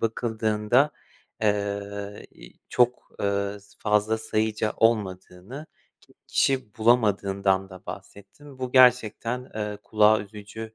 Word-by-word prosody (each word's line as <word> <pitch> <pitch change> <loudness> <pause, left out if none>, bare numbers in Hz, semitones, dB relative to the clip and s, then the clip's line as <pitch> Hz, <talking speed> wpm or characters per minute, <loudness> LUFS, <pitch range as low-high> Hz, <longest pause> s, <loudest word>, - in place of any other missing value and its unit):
bakıldığında, 110 +3 +1 0.5
eee, 100 -1 -2
i - - -15 0.2
çok, 125 0 +1
ııı, 100 0 -1
s 100 +1 -22
fazla 105 +1 +1
sayıca 110 -1 -1
olmadığını, 105 +4 -1 0.3
ki - - -24
kişi 130 -5 0
bulamadığından 100 -4 +2
da 95 -1 -13
bahsettin. 115 +8 -11
Bu 130 -1 -4
gerçekten, 125 -1 +3
eee, 105 -1 -4
kulağa 110 0 +4
üzücü 105 +2 -9
105 Hz, 105 wpm, -25 LUFS, 100-115 Hz, 0.5 s, kulağa